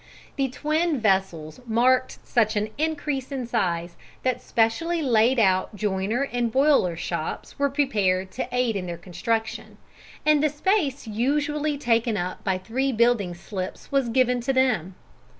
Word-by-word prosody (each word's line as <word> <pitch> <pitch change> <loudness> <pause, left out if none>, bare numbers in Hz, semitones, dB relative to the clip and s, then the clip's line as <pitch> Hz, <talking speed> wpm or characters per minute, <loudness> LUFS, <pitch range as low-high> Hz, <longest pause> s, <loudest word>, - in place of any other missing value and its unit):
The 270 -1 0
twin 310 +3 0
vessels 190 -7 0
marked 250 +3 +2
such 220 -2 +2
an 210 +1 0
increase 295 -4 -2
in 265 -3 -3
size 170 -6 -1 0.3
that 255 -1 0
specially 315 +10 0
laid 240 0 +3
out 190 -1 +2
joiner 205 +4 -1
and 245 -3 -1
boiler 265 - +3
shops 170 - -5
were 280 0 +2
prepared 200 -10 0
to - - -4
aid 250 -3 +1
in 185 -2 -3
their 170 -1 -5
construction, 220 +5 -3 0.5
and 305 -1 +4
the 305 - +4
space 295 -3 0
usually 290 +6 0
taken 230 -4 +1
up 180 0 -4
by 190 -2 0
three 255 +8 -1
building 230 -6 +2
slips 185 +1 -7
was 275 -3 +1
given 250 0 +2
up - - -7
to 270 - +1
them. 245 -9 +1
235 Hz, 150 wpm, -25 LUFS, 195-275 Hz, 0.5 s, and